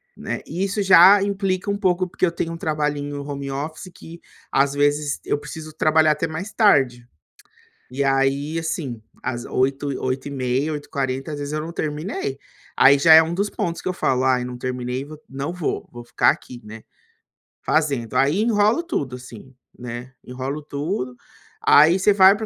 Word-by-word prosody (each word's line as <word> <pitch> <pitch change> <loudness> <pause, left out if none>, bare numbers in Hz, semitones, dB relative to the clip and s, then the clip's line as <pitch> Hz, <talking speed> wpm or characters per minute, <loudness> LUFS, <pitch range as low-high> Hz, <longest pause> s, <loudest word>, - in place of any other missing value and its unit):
né. - - -5
E 175 +5 -3
isso 200 +1 -1
já 195 +1 +7
implica 195 -1 -1
um 200 - 0
pouco, 185 -2 +1
porque 185 - 0
eu 170 - 0
tenho 165 0 -3
um - - -6
trabalhinho 145 -2 -2
home 140 -1 -5
office 155 +6 -5
que 170 +1 -12 0.3
às 140 +1 +2
vezes 145 0 0
eu - - 0
preciso 155 +1 -9
trabalhar 155 0 +3
até 150 +2 -1
mais 165 +7 -6
tarde. 135 - +3 0.9
E 135 +2 -2
aí 135 +3 +1
assim, 150 -8 -4 0.2
às 120 -1 -4
20:00, 135 +2 -1
20:30, 130 +2 -2
20:40 135 -1 -4
às 145 - -5
vezes 145 0 -5
eu 155 - -1
não 160 +2 -6
terminei. 150 -2 -4 0.4
Aí 140 +1 +6
já 160 +3 +6
é 160 - +9
um 165 +1 -3
dos 200 +3 0
pontos 170 -1 -3
que - - -3
eu - - 0
falo: 130 -6 0
"Ai 130 -1 +2
não 125 0 -6
terminei 125 +1 -4
vou 155 +1 -11
não 135 +4 -4
vou, 180 -4 -3
vou 120 - -9
ficar - - +3
aqui 120 -1 -7
né, 110 +1 -10 0.8
fazendo". 140 -7 0
Aí 145 +8 +2
enrolo 220 +5 +2
tudo 145 - -3
assim, 125 +1 -13 0.2
né. 125 +1 -7
Enrolo 130 +4 -5
tudo, 145 -3 -4 0.5
aí 160 +6 +6
você 200 +3 +4
vai 195 0 +7
pra 220 +1 -5
145 Hz, 175 wpm, -22 LUFS, 135-170 Hz, 0.9 s, é